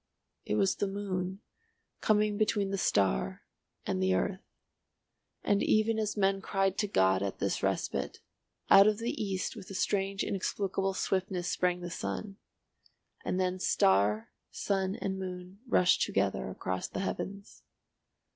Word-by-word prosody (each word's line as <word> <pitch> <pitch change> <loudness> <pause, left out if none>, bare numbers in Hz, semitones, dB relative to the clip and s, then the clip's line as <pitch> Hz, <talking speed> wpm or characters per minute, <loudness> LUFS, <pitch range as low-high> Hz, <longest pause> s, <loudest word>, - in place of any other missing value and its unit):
It 105 - -1
was 190 - +2
the 200 - 0
moon, 195 -1 -3 0.6
coming 210 -1 +2
between 205 -2 +1
the 195 - -1
star 95 - +1 0.4
and 95 - -1
the 95 0 +3
earth. 185 - -1 1.0
And 205 -1 +2
even 220 +1 +2
as 215 0 -1
men 195 -1 +2
cried 195 -1 0
to 210 - +1
God 95 - +3
at 100 -1 -2
this - - -1
respite, - - -1 0.5
out 195 +1 +8
of 215 -1 +3
the 230 +2 -2
East 190 -2 -2
with - - -10
a 195 - -7
strange 195 0 0
inexplicable 195 0 -1
swiftness 185 -2 -1
sprang 180 -1 0
the 175 0 -5
sun. 195 +3 -4 0.9
And 185 - -1
then 185 0 0
star, 105 - +2 0.2
sun 195 -1 -1
and 190 0 -3
moon 185 +1 -7
rushed 180 -6 +4
together 95 -10 0
across 95 0 -3
the - - -4
heavens. 200 +1 -5
190 Hz, 145 wpm, -31 LUFS, 180-200 Hz, 1.0 s, out